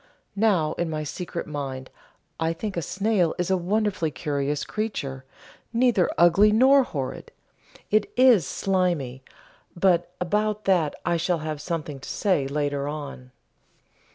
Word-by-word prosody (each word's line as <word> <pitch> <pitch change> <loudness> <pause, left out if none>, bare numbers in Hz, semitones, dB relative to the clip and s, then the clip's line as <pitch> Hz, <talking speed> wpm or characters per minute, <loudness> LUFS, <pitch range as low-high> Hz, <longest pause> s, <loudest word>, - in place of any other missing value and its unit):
Now 195 -8 +2
in 170 -1 0
my 155 -1 -3
secret 170 +3 -5
mind 135 -3 -5 0.5
I 165 0 0
think 200 +4 -5
a 170 - -1
snail 190 0 0
is 180 +1 -1
a - - +4
wonderfully 190 -2 0
curious 145 +1 -2
creature, 140 -12 -4 0.5
neither 235 -6 +3
ugly 180 +5 +6
nor 265 +5 +6
"horrid" 140 - -5 0.6
it 215 -1 +2
is 245 - +6
slimy, 175 -10 -1 0.5
but 175 -1 +2
about 210 +3 -1
that 175 -6 +2
I 175 -1 +2
shall 175 +1 0
have 155 -2 -4
something 155 -4 -4
to - - -9
say 180 -10 +1
later 145 0 -1
on. 145 -4 -6
170 Hz, 135 wpm, -25 LUFS, 145-200 Hz, 0.6 s, ugly